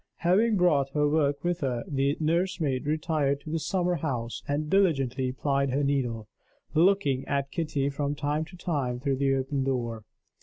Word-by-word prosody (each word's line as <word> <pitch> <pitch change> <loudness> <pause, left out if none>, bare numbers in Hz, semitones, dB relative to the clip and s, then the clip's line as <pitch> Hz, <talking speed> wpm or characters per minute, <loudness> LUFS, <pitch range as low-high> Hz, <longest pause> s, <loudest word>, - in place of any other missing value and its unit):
Having 205 +6 +3
brought 150 -7 +3
her 150 -1 +2
work 145 -2 +1
with 175 0 0
her, 125 -5 -1
the 140 0 0
nursemaid 160 -4 0
retired 150 -2 0
to 155 - -8
the 165 - 0
summer 180 +1 0
house 125 -6 -3
and 145 +2 -1
diligently 135 -9 +2
plied 140 +1 0
her 140 +3 0
needle, 125 -6 -1 0.5
looking 160 -5 +3
at 140 -1 -1
Kitty 150 -5 -1
from 140 +1 -2
time 145 +2 -1
to 180 +2 -13
time 140 -8 -2
through 135 +1 -1
the 135 0 +2
open 135 +1 -1
door. 120 -4 -2
145 Hz, 165 wpm, -27 LUFS, 135-160 Hz, 0.5 s, Having